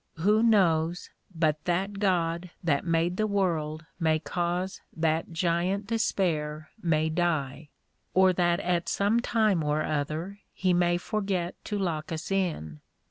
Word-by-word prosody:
Who 210 +7 +3
knows 175 -6 +2 0.2
but 155 -2 +1
that 195 +3 -1
God 175 -3 0
that 145 -5 +1
made 165 +2 +1
the 215 - +1
world 160 -6 -1
may 160 -2 +3
cause 175 +3 -2 0.2
that 160 +1 0
Giant 175 +4 0
Despair 155 -8 -1
may 160 -3 +2
die? 155 -4 -1 0.5
or 190 0 +5
that 175 0 +2
at 175 -1 0
some 205 +4 +2
time 215 -8 +2
or 150 +1 +1
other 155 +7 -3 0.2
he 185 -1 +1
may 175 0 +3
forget 190 -3 -2
to 210 - -2
lock 170 -6 -2
us 160 +3 -4
in? 155 - -2
175 Hz, 135 wpm, -28 LUFS, 160-190 Hz, 0.5 s, or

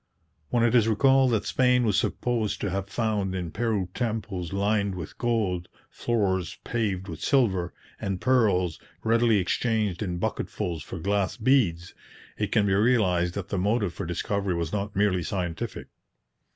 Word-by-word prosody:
When 120 - +2
it 120 - +3
is 115 -3 +5
recalled 130 +4 +4
that 115 -3 0
Spain 125 -1 +3
was 105 -3 +2
supposed 110 +1 0
to 100 - -1
have 100 +1 -3
found 105 -3 -1
in 90 -3 -3
Peru 105 -3 -1
temples 105 -7 -3
lined 100 0 0
with 90 -5 -7
gold, 105 -8 0 0.2
floors 95 -7 -1
paved 100 -5 -2
with - - -7
silver, 95 -11 +2 0.3
and 95 -2 -2
pearls 100 -10 +2 0.2
readily 115 -1 +3
exchanged 105 0 0
in 90 -4 -2
bucketfuls 85 -1 -3
for 95 - -7
glass 100 +4 0
beads, 110 -9 +2 0.4
it - - -2
can 105 - +3
be 95 - +2
realized 95 -5 +2
that 100 -1 -5
the 100 - -1
motive 100 -1 +1
for 100 - -5
discovery 95 +2 -1
was 85 0 -3
not 105 0 -3
merely 100 -2 +2
scientific. 85 -2 -4
100 Hz, 155 wpm, -26 LUFS, 90-115 Hz, 0.4 s, is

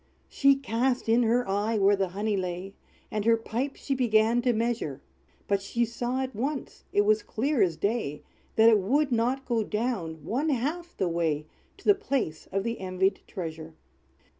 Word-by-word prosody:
She 275 0 +4
cast 255 -1 -1
in 230 +2 +4
her 240 0 +2
eye 205 +3 0
where 200 0 +5
the 195 -1 0
honey 205 +3 -1
lay, 185 +1 -4 0.4
And 210 -1 -1
her 230 +1 +4
pipe 240 +5 -3
she 275 - -3
began 235 -2 +3
to 245 0 +2
measure; 225 - -1 0.5
But 200 -1 +1
she 235 +4 0
saw 240 +3 -2
at 260 -3 -6
once 270 +4 -4
it 205 - +4
was 215 +1 +3
clear 265 +4 0
as 170 -5 +2
day, 200 -9 -2 0.3
That 225 0 +6
it 220 -2 +5
would 270 +9 +1
not 250 +3 +1
go 230 -3 +1
down 200 - -3
one 275 - 0
half 310 +7 -2
the 190 - +1
way 165 -3 0 0.3
To - - -19
the 410 - +7
place 275 - -2
of 195 0 0
the 230 +1 -3
envied 190 +1 0
treasure. 160 -2 -6
225 Hz, 180 wpm, -27 LUFS, 195-250 Hz, 0.5 s, the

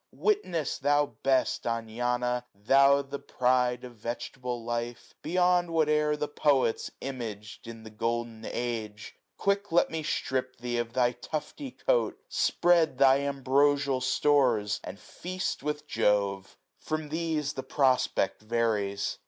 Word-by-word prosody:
Witness, 180 - 0
thou 145 -1 +2
best 135 -1 +1
Anana! 120 +2 -1
thou 140 +7 +4
the 140 +1 -6
pride 125 -2 +1
685 125 - -9
Of 120 - -20
vegetable 120 0 -5
life, 120 0 -4
beyond 180 +1 +2
whatever 150 -2 +2
The 150 - -2
poets 140 -5 +1
imag'd 115 -6 -6
in 115 -1 -9
the 110 - -10
golden 115 +1 -3
age: 110 -3 -4 0.2
Quick 200 -1 0
let 175 - +3
me 160 -1 -2
strip 130 -4 -2
thee 120 0 -2
of 115 -1 -3
thy 125 -1 +3
tufty 155 - -6
coat. - - 0
Spread 170 -5 +2
thy 135 0 +6
ambrosial 140 0 +1
stores, 125 -6 +2
and 100 - -8
feast 185 +1 -4
with 150 +1 -3
Jove! 100 -5 0 0.2
From 155 -1 -4
these 155 -2 -1
the 130 - -4
prospect 130 -5 +1
varies. 110 -3 -1
130 Hz, 130 wpm, -28 LUFS, 115-150 Hz, 0.2 s, thy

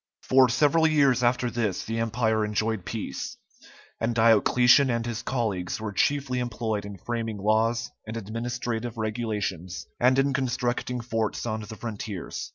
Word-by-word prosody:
For 130 -1 +5
several 150 +6 +4
years 140 -5 +3
after 125 0 +1
this 110 -6 -1
the 115 +1 -2
empire 110 -1 +1
enjoyed 105 -1 -1
peace, 110 0 -5 0.6
and 115 +1 -1
Diocletian 120 +4 +5
and 115 -1 0
his 120 -2 -3
colleagues 105 -9 -2
were 110 -1 -4
chiefly 135 +2 +1
employed 110 -3 -2
in 100 -1 -8
framing 115 +2 -3
laws 110 +4 +1 0.2
and 110 +1 -4
administrative 115 +1 -4
regulations, 105 -5 -3
and 130 +2 +4
in 135 0 +2
constructing 125 -1 -1
forts 115 -2 -2
on 110 -2 -2
the 105 +1 -8
frontiers. 105 -4 -5
115 Hz, 145 wpm, -26 LUFS, 110-125 Hz, 0.6 s, For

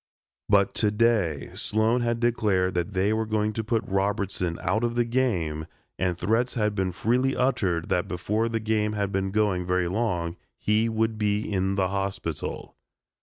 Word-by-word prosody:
But 100 -1 +4
to 105 - +4
day 105 -9 +1
Sloan 110 +3 +1
had 120 0 0
declared 105 -6 +1
that 90 +4 -2
they 100 +3 +2
were 110 0 -1
going 110 0 0
to 110 - -2
put 115 +1 0
Robertson 95 -3 -1
out 110 +4 +1
of 120 0 0
the 120 0 +2
game 90 -11 0 0.3
and 90 -2 0
threats 115 +7 +1
had 105 -3 +1
been 95 -2 -1
freely 125 +8 +1
uttered 95 -10 0
that 90 - +1
before 105 +6 -1
the 115 0 -1
game 105 -1 0
had 100 -2 -1
been 95 0 0
going 100 -3 +1
very 90 0 +1
long 90 -4 -1 0.2
he 110 +2 +2
"would 110 0 0
be 105 -1 +1
in 95 -2 -1
the 95 -2 +1
hospital." 95 -4 -4
105 Hz, 170 wpm, -26 LUFS, 95-115 Hz, 0.3 s, But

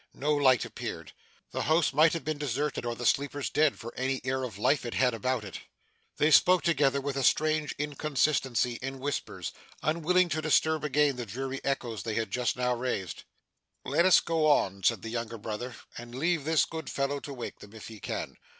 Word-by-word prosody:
No 150 +2 0
light 130 -5 +4
appeared. - - -6 0.4
The - - -2
house 155 -1 +2
might 155 +3 +5
have 165 - -3
been 155 -1 -2
deserted, 145 -2 -2
or 120 - -2
the 120 - -6
sleepers 140 +2 0
dead, 150 -2 +3
for 120 -1 -8
any 130 +1 -1
air 130 +1 -1
of 115 -7 -5
life 130 +6 +2
it 120 - -5
had 125 -2 +3
about 120 +1 -1
it. 95 - -7 0.6
They 150 +1 +3
spoke 180 +4 +6
together 140 -5 +2
with 140 0 -3
a 135 - -1
strange 155 +2 +2
inconsistency, 140 -4 0
in 135 +1 -4
whispers; 140 +2 -4 0.3
unwilling 170 +4 +2
to 155 0 -1
disturb 155 0 +2
again 145 -2 +2
the 120 -2 -5
dreary 135 +6 -4
echoes 120 -6 -2
they 110 +2 -3
had 115 -3 -2
just 125 +2 0
now 125 0 +1
raised. 120 -7 -3 0.6
'Let 170 - +3
us 185 - +7
go 160 -2 +1
on,' 100 -10 +2
said - - +2
the 115 - -5
younger 115 0 -4
brother, 110 +3 -5 0.2
'and 120 0 -10
leave 160 +2 0
this 160 -1 +3
good 160 -1 -6
fellow 140 +1 -1
to 140 - -8
wake 125 -3 -7
them, 105 - -13
if 110 - -9
he 110 -2 -10
can. - - -5
135 Hz, 200 wpm, -29 LUFS, 120-150 Hz, 0.6 s, us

